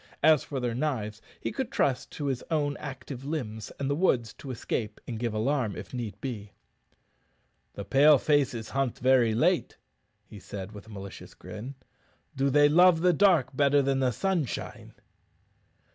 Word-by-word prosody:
As 155 -3 +6
for 140 - -4
their 120 -2 -1
knives, 115 -6 -2 0.2
he - - -3
could 250 +1 -3
trust 130 -2 0
to 145 - -5
his 135 -3 -1
own 145 -3 0
active 135 -2 -8
limbs 125 -8 -4
and 140 - -1
the 140 - +1
woods 120 - +1
to 140 - -9
escape 115 -3 -3
and 115 -3 -5
give 120 -2 -2
the - - -2
alarm 120 -2 0
if - - -9
need 110 -5 -5
be. 105 -6 -6 1.2
"The 100 - -6
Pale 145 +7 +6
faces 130 -6 +1
hunt 135 -3 -1
very 125 -3 +3
late," 120 - +1 0.5
he 105 - -12
said, 95 +1 -7
with 105 0 -11
a - - -13
malicious 100 -2 -9
grin. 115 +6 -8 0.6
"Do 135 +1 +1
they 145 +2 +5
love 170 +2 +5
the 180 0 +4
dark 170 -7 +3
better 140 0 +4
than 135 0 +1
the 130 -1 +2
sunshine?" 165 - -3
130 Hz, 170 wpm, -28 LUFS, 110-145 Hz, 1.2 s, As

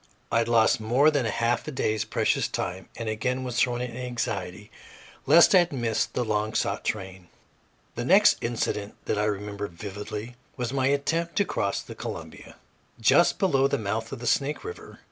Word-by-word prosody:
I 115 - +3
lost 115 -1 +3
more 125 +8 +3
than 140 -6 0
a - - 0
half 115 +3 0
day's 110 -7 -1
precious - - +1
time, 95 +2 -4
and 115 - -5
again 125 +4 -1
was 125 -1 -2
thrown 120 -1 +1
into 125 0 -5
anxiety 125 -2 -4 0.6
lest 170 - +7
I 185 - +8
had 175 -1 +1
missed 120 -5 -1
the 125 - 0
long 110 0 -1
sought - - -1
train. 95 -3 -4 0.7
The 120 - -4
next 195 +10 +5
incident 110 -3 -2
that 105 - -1
I 105 - +1
remember 105 0 -3
vividly 105 +6 -7 0.2
was 125 0 -3
my 135 -1 +1
attempt 160 +5 0
to 200 - +2
cross 100 - -2
the - - -9
Columbia, - - -8 0.4
just 145 +10 +4
below 135 -8 +3
the - - 0
mouth 110 +1 -3
of 135 - -5
the 120 - -8
Snake 140 +4 0
River. 440 +1 -9
120 Hz, 180 wpm, -26 LUFS, 105-135 Hz, 0.7 s, I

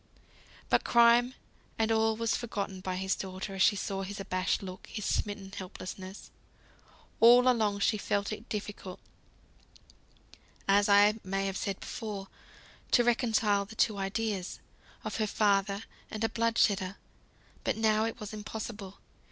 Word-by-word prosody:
But - - +3
crime 235 +2 +5 0.4
and 225 0 +1
all 220 0 +2
was 230 -1 +1
forgotten 200 -5 -4
by 185 -1 -3
his 190 +1 0
daughter, 190 +1 -6
as 190 - -3
she 205 - +5
saw 195 -1 -3
his 200 +1 -6
abashed 185 0 -1
look, 185 0 -8
his 210 - -5
smitten 205 -2 -2
helplessness. 185 +1 -8 0.9
All 245 +2 +7
along 215 -5 +2
she 215 - +3
had - - -8
felt 205 -1 0
it 215 +2 -7
difficult 205 -3 -5 1.7
(as 200 +1 +4
I 205 +2 +6
may 195 +1 -1
have 195 -1 -2
said 195 -1 -3
before) 205 -4 -6 0.6
to 240 - +5
reconcile 225 -4 +2
the 220 +3 -12
two 210 -2 +2
ideas, 195 -1 -2 0.4
of - - -4
her 215 -1 0
father 200 0 +1 0.3
and 215 0 -4
a 225 - +2
blood 230 0 0
shedder. 195 -2 +2 0.7
But - - 0
now 220 0 +3
it 225 - -4
was 210 0 -7
impossible. 210 -2 -6
205 Hz, 150 wpm, -30 LUFS, 195-225 Hz, 1.7 s, All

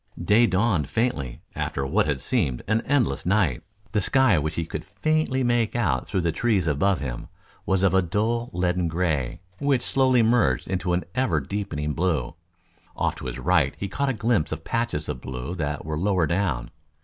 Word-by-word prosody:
Day 105 +7 +4
dawned 95 - +1
faintly 70 - -1
after 70 - -2
what 70 - +1
had 70 -3 -1
seemed 60 -2 0
an 110 +2 +2
endless 125 - +1
night. 90 - +1 0.3
The 105 - +1
sky 115 -4 +3
which 75 +1 -2
he 85 - -1
could - - -5
faintly 130 +7 0
make 120 -2 +1
out 80 - 0
through 95 - 0
the 85 -1 +1
trees 100 +1 +1
above 85 +5 +2
him, 60 -4 -5 0.4
was 95 0 +2
of 95 -2 +4
a 95 - +5
dull 110 +7 -1
leaden 90 0 0
gray, 80 -7 -1 0.2
which 135 -3 +1
slowly 130 -3 +3
merged 110 - +2
into 90 -1 -1
an 90 - +1
ever 130 0 +1
deepening 85 -8 -3
blue. 80 -7 0 0.6
Off - - 0
to - - -6
his 60 - -4
right 85 -6 +2
he 100 - -3
caught 135 +4 -1
glimpses 105 -8 +1
of 80 0 -7
patches 115 -10 -2
of 60 - -4
blue 65 +5 -5
that 75 -5 -3
were 75 -1 -3
lower 95 -2 +2
down. 80 -8 -1
90 Hz, 185 wpm, -25 LUFS, 75-115 Hz, 0.6 s, a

